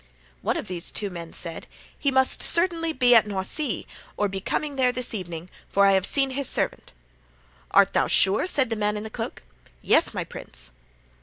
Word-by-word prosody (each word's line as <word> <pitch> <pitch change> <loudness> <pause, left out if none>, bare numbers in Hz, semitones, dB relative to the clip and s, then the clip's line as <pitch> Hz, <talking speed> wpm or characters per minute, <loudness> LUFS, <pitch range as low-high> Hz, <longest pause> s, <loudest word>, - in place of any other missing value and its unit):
"One - - 0
of - - -5
these 180 -1 -1
two 205 -2 -2
men 170 -2 -8
said, 165 -2 -4 0.3
'He 285 - +1
must 265 -1 +2
certainly 335 -1 +2
be 250 -4 +4
at 225 -2 +6
Noisy, 205 - -2 0.3
or 205 - +1
be 195 0 -5
coming 290 +8 -2
there 255 -2 +3
this 250 0 -3
evening, 175 -4 -6 0.2
for 200 0 +3
I 195 - +6
have 190 -1 +2
seen 270 -1 +2
his 275 0 0
servant.' - - -2 0.8
"'Art - - +4
thou - - +2
sure?' 195 - +4
said 265 -9 0
the - - +1
man 210 0 0
in 210 - -5
the 220 - -8
cloak. 225 0 -6 0.4
"'Yes, - - +3
my - - -3
prince. - - -9
220 Hz, 190 wpm, -25 LUFS, 190-265 Hz, 0.8 s, at